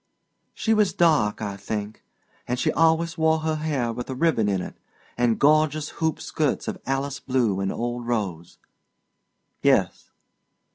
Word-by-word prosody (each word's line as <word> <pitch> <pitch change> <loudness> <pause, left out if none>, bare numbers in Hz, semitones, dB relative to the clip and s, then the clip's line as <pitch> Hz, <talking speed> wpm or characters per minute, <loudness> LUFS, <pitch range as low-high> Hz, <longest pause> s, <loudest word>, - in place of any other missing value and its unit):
"She 220 - +1
was 210 -3 +2
dark, 150 -12 +2
I 100 -1 -3
think; 105 +1 -5 0.4
and 125 - -1
she - - +1
always 165 +1 +2
wore 160 0 +3
her 155 0 -1
hair 140 -7 -1
with 125 +3 -6
a 130 - -3
ribbon 130 -8 +2
in 95 -2 0
it, - - -7 0.4
and 120 -2 +2
gorgeous 155 +1 +3
hoop 160 -1 0
skirts 150 -4 -1
of - - -4
Alice 135 +1 -2
blue 120 -7 0
and 95 0 -1
old 120 0 -4
rose." 95 -8 -3 1.0
"Yes." - - +2
130 Hz, 150 wpm, -24 LUFS, 110-155 Hz, 1.0 s, wore